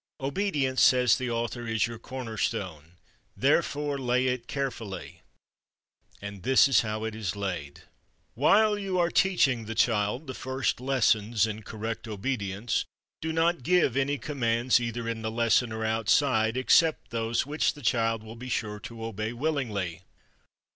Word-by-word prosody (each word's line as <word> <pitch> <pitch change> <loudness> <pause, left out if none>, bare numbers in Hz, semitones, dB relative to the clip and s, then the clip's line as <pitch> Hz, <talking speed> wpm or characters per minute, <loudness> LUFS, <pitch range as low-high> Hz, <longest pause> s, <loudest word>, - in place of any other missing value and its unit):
Obedience, 140 -3 0
says 125 -3 +5
the 130 -1 -3
author, 120 0 -3
"is 115 -2 +1
your 115 -1 -7
corner 120 -2 -7
stone. 85 -6 -3 0.4
Therefore 145 0 +1
lay 125 0 +1
it 125 -2 -1
carefully." 115 -9 -5 1.0
And 100 -1 -8
this 130 +7 +5
is 135 - +4
how 110 -1 -3
it 110 -1 -3
is 105 -4 -3
laid: 90 -8 -5 0.5
"_While 210 -1 +4
you 190 -2 -2
are 175 -1 +2
teaching 135 - +2
the 115 +1 -5
child 110 +4 +1
the 130 - -6
first 130 -2 -2
lessons 115 -5 +2
in 110 0 -5
correct 110 +2 -5
obedience, 105 -1 -2 0.4
do 160 - -2
not 165 -1 +1
give 170 -4 +2
any 140 +1 +1
commands 125 -4 +1
either 115 -1 -4
in 115 -1 -3
the 110 - -2
lesson 115 +1 +2
or 110 0 -3
outside 110 +1 +2
except 160 +5 +3
those 115 +1 0
which 150 +2 0
the 145 - -12
child 115 -2 +1
will 110 +1 -10
be 125 +2 -8
sure 105 -3 -2
to 115 +1 -8
obey 110 +1 -4
willingly. 115 - -2
115 Hz, 155 wpm, -27 LUFS, 110-135 Hz, 1.0 s, says